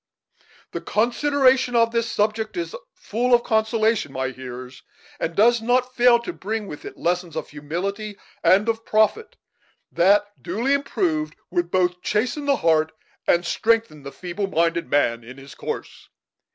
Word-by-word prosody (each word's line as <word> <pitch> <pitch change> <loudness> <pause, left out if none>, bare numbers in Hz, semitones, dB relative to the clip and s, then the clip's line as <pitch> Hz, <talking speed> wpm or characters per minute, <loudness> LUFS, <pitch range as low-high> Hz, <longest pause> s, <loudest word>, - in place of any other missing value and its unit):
"The - - -5
consideration 255 +2 +2
of 230 0 +4
this 230 0 -1
subject 215 +3 -1
is 345 +5 -3 0.2
full 245 +3 +1
of 240 - +1
consolation, 220 - +1
my 130 -1 -2
hearers, 130 0 -9 0.4
and 165 - -2
does 235 +2 +4
not 250 +2 +1
fail 245 -1 +5
to 355 - -5
bring 215 - -4
with 150 -6 -9
it - - -9
lessons 175 -1 -1
of - - -4
humility 195 +8 -4 0.3
and 200 +4 +4
of 225 0 -1
profit, 220 - +1 0.5
that, 200 +4 +4 0.2
duly 225 +10 0
improved, 170 - -1 0.2
would 175 -1 0
both 180 0 +1
chasten 245 +10 -1
the 280 -1 +3
heart 160 -4 +2 0.3
and 175 0 +3
strengthen 220 -6 +1
the 140 0 -8
feeble 180 +6 -4
minded 170 -1 0
man 120 -5 +1
in 125 +3 -11
his 135 0 -12
course. - - -7
210 Hz, 150 wpm, -23 LUFS, 165-235 Hz, 0.5 s, fail